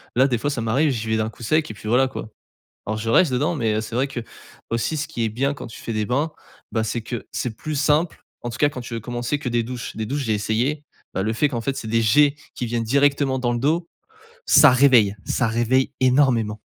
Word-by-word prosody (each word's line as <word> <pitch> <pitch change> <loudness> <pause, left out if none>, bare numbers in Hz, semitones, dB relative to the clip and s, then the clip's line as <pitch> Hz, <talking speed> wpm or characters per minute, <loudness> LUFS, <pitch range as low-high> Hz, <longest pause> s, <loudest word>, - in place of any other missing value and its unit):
Là 130 +3 +5
des 125 -3 0
fois 145 +6 -1
ça 120 - -3
m'arrive, 135 +7 +2
j'y 115 -3 -3
vais 110 - +2
d'un 110 0 -1
coup 115 - -16
sec 155 +3 +1
et - - -7
puis 105 - -10
voilà, 130 +3 +4
quoi. 110 - -7 0.6
Alors, 110 0 -2
je 115 +1 -3
reste 145 +4 +4
dedans 150 +7 +1
mais 115 -5 0
heu, 110 - 0
c'est 110 +1 -6
vrai 135 +3 +1
qu'aussi 120 +1 -5
ce 155 - -2
qui 115 - -3
est - - 0
bien 135 +6 -1
quand - - -8
tu 115 - -11
fais - - -5
des 110 -1 -1
bains, 145 +7 0 0.4
bah, 110 -1 0
c'est 115 +2 -2
que 110 -1 -6
c'est 115 -3 -3
plus 155 - -5
simple, 150 +4 +1 0.2
en 120 - -3
tout 115 - -7
cas 145 - +4
quand 130 -3 -7
tu 120 0 -8
veux 115 - -2
commencer 120 +5 -3
que 140 - -5
des 120 0 +1
douches. 120 0 -6
Des 110 0 -3
douches, 140 +4 -2
j'ai 110 - +1
essayé, 120 +8 -1 0.3
bah, 95 - -1
le 110 +1 0
fait 145 +6 +2
qu'en 120 -4 -3
fait, 135 +3 -2
c'est 110 - -5
des 115 +1 +2
jets 145 +6 +4 0.2
qui 120 - -4
viennent 115 0 -1
directement 140 +1 +2
dans 120 -1 0
le 120 - -1
dos, 165 +6 0 0.6
ça 155 - +7
réveille, 125 -6 +5
ça 125 - 0
réveille 120 +3 +1
énormément. 125 -5 +2
120 Hz, 255 wpm, -22 LUFS, 110-140 Hz, 0.6 s, ça